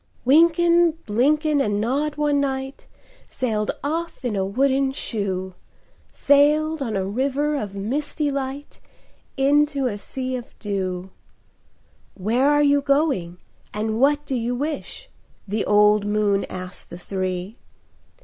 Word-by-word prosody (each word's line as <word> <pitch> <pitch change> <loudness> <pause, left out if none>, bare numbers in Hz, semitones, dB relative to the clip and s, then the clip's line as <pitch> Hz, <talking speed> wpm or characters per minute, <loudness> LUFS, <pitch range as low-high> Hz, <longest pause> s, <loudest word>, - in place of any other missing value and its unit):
Wynken, 335 +4 +5
Blynken, 290 +7 +2
and 205 -1 -1
Nod 285 +7 -1
one 295 -1 +1
night 270 - -3 0.4
Sailed 215 -5 -2
off 325 -1 -3
in 230 -4 -1
a 195 - 0
wooden 265 +6 +1
shoe,— 190 -7 -3 0.6
Sailed 300 +2 +3
on 230 -6 -2
a 190 -1 -1
river 275 +8 -1
of 210 -8 -4
crystal 285 +8 -2
light 275 +1 -5 0.6
Into 285 0 +2
a 205 -5 -2
sea 260 +3 -4
of 245 -2 -9
dew. 190 -3 -3 1.0
"Where 235 +8 +1
are 295 0 +4
you 285 0 +4
going, 275 - 0 0.4
and 220 +1 -2
what 290 +2 +3
do 275 - -4
you 245 0 -1
wish?" 300 - -5 0.4
The 210 +2 -1
old 210 0 +4
moon 205 -1 +1
asked 185 0 -8
the 175 - -8
three. 185 +2 -4
265 Hz, 130 wpm, -22 LUFS, 205-290 Hz, 1.0 s, Wynken